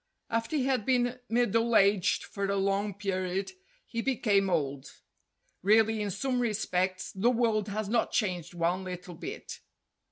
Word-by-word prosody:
After 230 +6 -1
he 270 -4 +1
had 260 -4 +1
been 245 +1 +1
middle 230 0 +2
aged 195 -2 +3
for 200 -1 -4
a 200 - 0
long 200 0 0
period 190 - -2 0.3
he 230 - -3
became 210 -7 +2
old. 140 -5 -1 0.7
(Really 220 +2 +4
in 205 - -1
some 250 +6 -1
respects 185 -5 -1
the 195 +5 +2
world 225 -4 +1
has 210 0 -3
not 230 +2 +1
changed 180 -5 -1
one 175 +2 0
little 180 -1 -7
bit.) 395 - -7
205 Hz, 150 wpm, -29 LUFS, 185-230 Hz, 0.7 s, Really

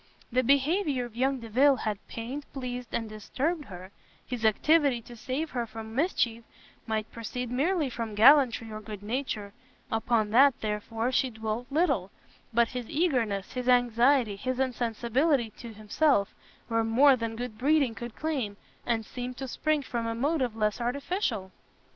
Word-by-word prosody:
The 255 +2 +3
behaviour 280 - +2
of 235 -2 -12
young 265 +1 0
Delvile 260 +5 +4
had 215 -5 -3
pained, 255 +6 -6
pleased, 250 -2 -5
and 225 - -2
disturbed 275 +9 -3
her; 185 -2 -10 0.3
his 245 -2 -5
activity 280 +4 +3
to 240 - -12
save 270 +7 -3
her 240 -2 -2
from 220 0 -8
mischief 240 -6 0 0.4
might 220 -1 -2
proceed 240 +1 -5
merely 305 +5 +1
from 230 -4 -5
gallantry 240 -1 +5
or 215 0 -6
good 210 -1 -8
nature; 215 -3 -3 0.4
upon 225 -1 +1
that, 270 +3 +5
therefore, 225 +3 -2
she 260 0 +2
dwelt 220 +1 -4
little: 325 +6 +1 0.4
but 235 0 +3
his 250 -3 -5
eagerness, 245 - 0
his 250 0 -2
anxiety, 245 -2 +3
his 255 +4 -3
insensibility 245 +1 +1
to 235 -2 -8
himself, 215 +1 +1 0.3
were 230 -1 +1
more 260 +5 +5
than 230 -2 -4
good 235 -2 -6
breeding 280 -3 +3
could 240 0 -8
claim, 265 -10 -2 0.3
and 225 -2 0
seemed 250 +1 -6
to 270 - -5
spring 305 +3 0
from 235 -3 -3
a 230 - -2
motive 260 -2 0
less 215 +1 0
artificial. 245 - -2
245 Hz, 155 wpm, -28 LUFS, 225-270 Hz, 0.4 s, gallantry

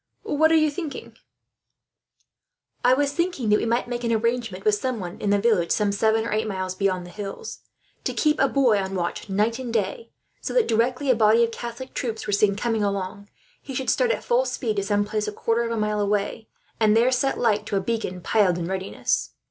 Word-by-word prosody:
What 315 +2 +2
are - - +5
you 310 -1 +4
thinking 310 -1 -5
of?" - - -23 1.7
"I 250 +1 +5
was 285 +1 +1
thinking 340 -7 -1
that 210 - +4
we - - -1
might 235 +2 0
make 240 0 -4
an 235 - 0
arrangement 225 -3 -1
with 215 - +4
someone, 210 -5 -3
in 205 - +1
a 205 - +3
village 200 -6 +2
some 210 -2 +2
seven 220 +2 +2
or - - -3
eight 215 +1 0
miles 185 -2 -3
beyond 185 -2 -1
the 175 - -11
hills, 205 - -7 0.5
to - - -1
keep 300 -1 +2
a 270 - +4
boy 250 -7 +3
on 195 0 -3
watch 175 +3 -3
night 215 +5 +1
and 250 -3 -5
day; 345 - -2 0.3
so - - -4
that, - - +4
directly 250 +4 +1
a - - +3
body 220 +1 +5
of 230 - 0
Catholic 240 +3 -7
troops 225 -3 -3
were 205 - -2
seen 200 0 +3
coming 225 +1 -1
along, 200 0 -3 0.3
he 270 - -8
should 265 +1 0
start - - +2
at 480 - -1
full - - +2
speed 225 - -2
to 200 - +1
some 205 +1 +1
place 210 0 -2
a - - -2
quarter 230 +2 0
of - - -3
a 230 - -1
mile 210 0 0
away, 205 +2 -1 0.3
and 215 -1 +4
there 240 +3 +4
set 270 +2 +1
light 210 -3 +1
to - - -2
a - - +3
beacon 195 -3 -3
piled 190 -3 +2
in 170 - -3
readiness. 190 +2 -2
220 Hz, 225 wpm, -24 LUFS, 200-250 Hz, 1.7 s, are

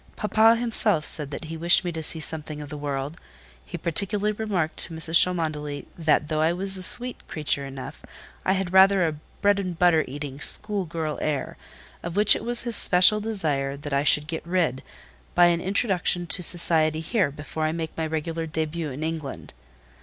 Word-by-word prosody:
Papa 220 +2 +3
himself 220 -8 +1
said 150 -3 -3
that 145 - -7
he 160 +1 -8
wished 170 +3 +3
me 175 - -2
to 160 -1 -6
see 160 +1 -4
something 155 -1 -6
of 145 -1 -9
the 150 - -7
world; 145 +2 -5 0.4
he 175 - -8
particularly 200 +5 -1
remarked 200 -7 -3
to 165 - -3
Mrs. 160 0 0
Cholmondeley, 155 -5 -4
that, 155 -2 0
though 155 0 -2
I 160 +2 +1
was 190 +2 +4
a 185 - +4
sweet 245 +6 +5
creature 145 -2 -2
enough, 135 -1 -10 0.4
I 190 - +1
had 190 -2 -3
rather 190 -1 +5
a 160 - -3 0.3
bread 205 0 +2
and 180 -3 -5
butter 170 -2 +3
eating, 140 0 -8
school 205 +1 +3
girl 155 -2 -5
air; 145 -4 -3 0.5
of 170 0 -7
which 210 0 +6
it - - -6
was 240 0 -1
his 235 -2 -2
special 185 +4 +4
desire 150 -11 -3
that 145 0 -7
I 140 +1 +1
should 150 0 +3
get 160 +1 -5
rid, 170 -7 -1 0.5
by 175 - +5
an 170 -1 +1
introduction 190 -3 0
to 180 - +2
society 160 -2 +2
here, 185 -1 -1
before 150 +2 -6
I 155 - -1
make 160 -1 -6
my 160 -1 -3
regular 160 +1 -4
début 160 0 -4
in 140 +4 -7
England. 160 -4 -6
165 Hz, 190 wpm, -24 LUFS, 150-190 Hz, 0.5 s, which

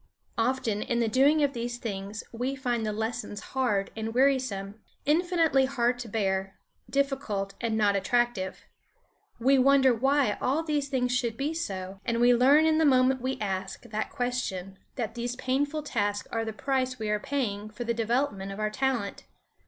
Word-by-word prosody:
Often 225 -3 0
in 235 +1 -1
the 230 - +2
doing 280 +7 +4
of 280 -1 +1
these 240 0 -3
things 205 -2 -5
we 250 +4 -2
find 245 -3 -1
the - - 0
lessons 220 0 -3
hard 225 -7 0
and 225 +1 -4
wearisome, 245 -7 +1 0.2
infinitely 325 -3 +3
hard 245 -2 0
to 240 - -6
bear, 195 -2 -1 0.3
difficult, 265 -8 -1
and 225 -2 0
not 205 -2 +3
attractive. 240 -2 0 0.7
We 265 +3 +4
wonder 265 -1 +5
why 270 -1 +2
all 285 +6 +1
these 295 -3 -1
things 250 -2 0
should 235 -3 -1
be 290 +3 -1
so, 195 - -5
and 235 -1 -1
we 245 +1 +6
learn 275 +6 +5
in 315 0 +3
the - - +4
moment 260 -2 +4
we 260 +1 -2
ask 190 -2 -3
that 215 0 -3
question 195 -7 -3 0.2
that 235 -3 -3
these 240 +1 -3
painful 285 +4 -1
tasks 205 -7 -1
are 225 -1 -1
the 220 - -3
price 260 +2 -1
we 215 -2 -2
are 210 - +1
paying 215 -5 -2
for 215 +3 -6
the 235 0 0
development 230 -3 -1
of 195 - -7
our 215 0 0
talent. 240 -4 -2
240 Hz, 175 wpm, -28 LUFS, 210-270 Hz, 0.7 s, we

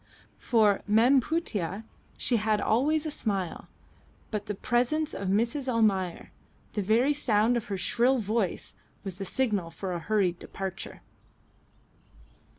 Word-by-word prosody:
For 215 -4 +3
"Mem 240 +6 +5
Putih" 220 - -2 0.3
she 240 - +1
had 215 0 +1
always 290 +10 +2
a 310 - -2
smile, 195 - -3 0.6
but 210 -1 -3
the 210 - -3
presence 255 +9 0
of 195 - -4
Mrs. 235 +8 0
Almayer, 195 -6 +1 0.4
the 210 - -1
very 230 +8 +3
sound 235 -4 +2
of 235 -1 -1
her 200 -4 -3
shrill 240 +8 +2
voice, 215 -3 -1 0.3
was 195 -1 -6
the 195 - -3
signal 205 -6 0
for 185 +2 -5
a 175 - -2
hurried 185 -2 0
departure. 195 +1 -7
215 Hz, 135 wpm, -28 LUFS, 195-245 Hz, 0.6 s, Mem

